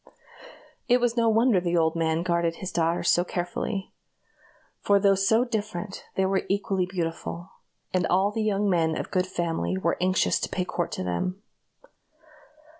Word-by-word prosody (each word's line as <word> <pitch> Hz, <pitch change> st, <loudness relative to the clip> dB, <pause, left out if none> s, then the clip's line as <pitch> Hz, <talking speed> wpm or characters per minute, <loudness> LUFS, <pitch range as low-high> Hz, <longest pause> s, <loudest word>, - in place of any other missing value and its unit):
It 245 Hz, +1 st, +4 dB
was 240 Hz, -1 st, +1 dB
no 230 Hz, -1 st, +3 dB
wonder 225 Hz, -2 st, +4 dB
the 175 Hz, -1 st, 0 dB
old 160 Hz, 0 st, +2 dB
man 165 Hz, 0 st, 0 dB
guarded 170 Hz, -1 st, 0 dB
his 185 Hz, +1 st, -6 dB
daughters 170 Hz, 0 st, 0 dB
so 175 Hz, -, +3 dB
carefully; 180 Hz, +3 st, -4 dB, 0.9 s
for 200 Hz, 0 st, +3 dB
though 200 Hz, 0 st, +4 dB
so 220 Hz, +5 st, +3 dB
different, 210 Hz, -4 st, -4 dB
they 190 Hz, -, +2 dB
were 190 Hz, 0 st, +1 dB
equally 195 Hz, -2 st, 0 dB
beautiful, 175 Hz, 0 st, -4 dB, 0.4 s
and 185 Hz, -1 st, +1 dB
all 190 Hz, +3 st, +2 dB
the 220 Hz, -, -2 dB
young 205 Hz, -1 st, +1 dB
men 165 Hz, -4 st, +1 dB
of -, -, -5 dB
good 185 Hz, -1 st, +1 dB
family 165 Hz, -, -2 dB
were 95 Hz, -, 0 dB
anxious 185 Hz, +1 st, +2 dB
to -, -, -3 dB
pay 180 Hz, -, -2 dB
court 175 Hz, -1 st, -3 dB
to -, -, -3 dB
them. 180 Hz, -, -3 dB
185 Hz, 165 wpm, -26 LUFS, 170-200 Hz, 0.9 s, It